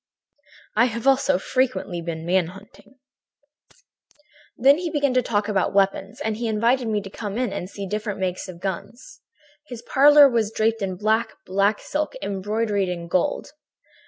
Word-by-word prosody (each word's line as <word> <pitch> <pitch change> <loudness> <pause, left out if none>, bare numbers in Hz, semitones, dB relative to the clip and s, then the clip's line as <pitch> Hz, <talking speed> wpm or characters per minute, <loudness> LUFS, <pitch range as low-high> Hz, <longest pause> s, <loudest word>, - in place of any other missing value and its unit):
"'I 235 - +6
have 235 -1 -4
also 275 +1 +3
frequently 255 -9 -1
been 165 -1 -5
man 180 -1 +2
hunting.' 200 +5 -15 1.6
"Then 275 +5 +5
he 350 -1 -3
began 285 -4 0
to 255 - +3
talk 210 -3 -1
about 200 -1 0
weapons, 195 0 +1
and 220 -1 -2
he 235 0 -2
invited 230 +3 +1
me 210 -2 0
to 195 - -9
come 205 0 -5
in 245 -5 -1
and 185 -2 -5
see 200 0 -7
different 210 +1 -4
makes 185 0 -3
of 180 -2 -10
guns. 200 - -7 0.5
"His 245 -3 -9
parlor 290 +1 +7
was 230 -5 0
draped 225 0 0
in 190 -2 -2
black, 220 +4 0
black 200 +2 +1
silk 305 +11 -3
embroidered 205 0 -1
in 170 -1 -5
gold. 180 0 -1
215 Hz, 160 wpm, -23 LUFS, 195-245 Hz, 1.6 s, parlor